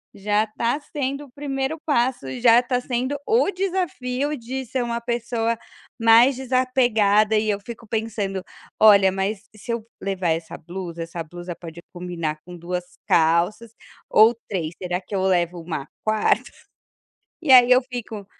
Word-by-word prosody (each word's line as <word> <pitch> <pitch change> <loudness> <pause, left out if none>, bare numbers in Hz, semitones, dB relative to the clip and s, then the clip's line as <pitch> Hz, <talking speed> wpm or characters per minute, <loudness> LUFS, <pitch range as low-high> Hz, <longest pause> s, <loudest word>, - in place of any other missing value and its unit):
Já 210 +2 +1
tá 230 +5 -1
sendo 280 -1 -4
o 265 - -20
1º 280 +2 -3
passo, 255 - +1
já 235 0 +6
tá 250 0 -1
sendo 255 +3 -2
o 450 -1 +3
desafio 300 -7 -2
de 255 +3 -5
ser 250 +2 -2
uma 235 0 -3
pessoa 235 -1 -1 0.4
mais 230 +4 +6
desapegada 240 -5 +2
e 215 0 0
eu 205 -1 0
fico 230 +1 -10
pensando: 210 -4 -3 0.4
"Olha, 200 -3 +7
mas 195 +2 -2
se 215 +3 -7
eu 230 -2 -3 0.2
levar 190 -3 -1
essa 160 0 -2
blusa, 170 -1 -6
essa 165 0 -6
blusa 175 +2 -8
pode 165 -1 -10
combinar 170 -4 -4
com 180 - -10
2 180 +1 -4 0.2
calças 170 +7 +2 0.4
ou 220 +3 +6
3, 170 -5 -3
será 180 0 -2
que 200 - -7
eu 190 - 0
levo 175 -2 +1
uma 160 -4 -5 0.2
4ª?" 215 0 +1 0.9
E 310 -5 +3
aí 250 -1 +8
eu 250 - +7
fico: 230 -5 -7
220 Hz, 155 wpm, -23 LUFS, 180-250 Hz, 0.9 s, aí